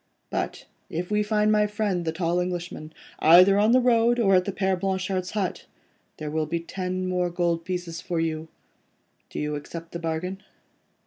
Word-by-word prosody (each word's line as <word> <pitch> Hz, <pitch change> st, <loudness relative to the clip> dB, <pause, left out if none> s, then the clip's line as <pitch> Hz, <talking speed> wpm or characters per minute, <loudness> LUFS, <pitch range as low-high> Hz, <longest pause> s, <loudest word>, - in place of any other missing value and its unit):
But -, -, -3 dB, 0.2 s
if 175 Hz, +4 st, -4 dB
we 210 Hz, 0 st, +3 dB
find 210 Hz, 0 st, +2 dB
my 210 Hz, -1 st, +3 dB
friend 205 Hz, -4 st, -1 dB
the 160 Hz, -, 0 dB
tall 170 Hz, +1 st, 0 dB
Englishman, 175 Hz, -3 st, -4 dB, 0.3 s
either 185 Hz, +5 st, +7 dB
on 215 Hz, +2 st, +4 dB
the 255 Hz, -, +6 dB
road 240 Hz, -1 st, +3 dB
or 195 Hz, -4 st, +4 dB
at 180 Hz, -1 st, +4 dB
the 200 Hz, -, -1 dB
Père 190 Hz, -1 st, 0 dB
Blanchard's 190 Hz, -1 st, -1 dB
hut, 190 Hz, -4 st, -2 dB, 0.5 s
there 150 Hz, -1 st, -5 dB
will 155 Hz, 0 st, -1 dB
be 170 Hz, -, -1 dB
ten 185 Hz, +2 st, -3 dB
more 180 Hz, -1 st, 0 dB
gold 170 Hz, -1 st, 0 dB
pieces 175 Hz, -1 st, -4 dB
for 170 Hz, -2 st, -2 dB
you. 160 Hz, -1 st, -2 dB, 0.8 s
Do -, -, -9 dB
you 150 Hz, 0 st, -2 dB
accept 165 Hz, +3 st, -7 dB
the 170 Hz, -, -5 dB
bargain?" 170 Hz, +4 st, -3 dB
180 Hz, 180 wpm, -25 LUFS, 165-195 Hz, 0.8 s, either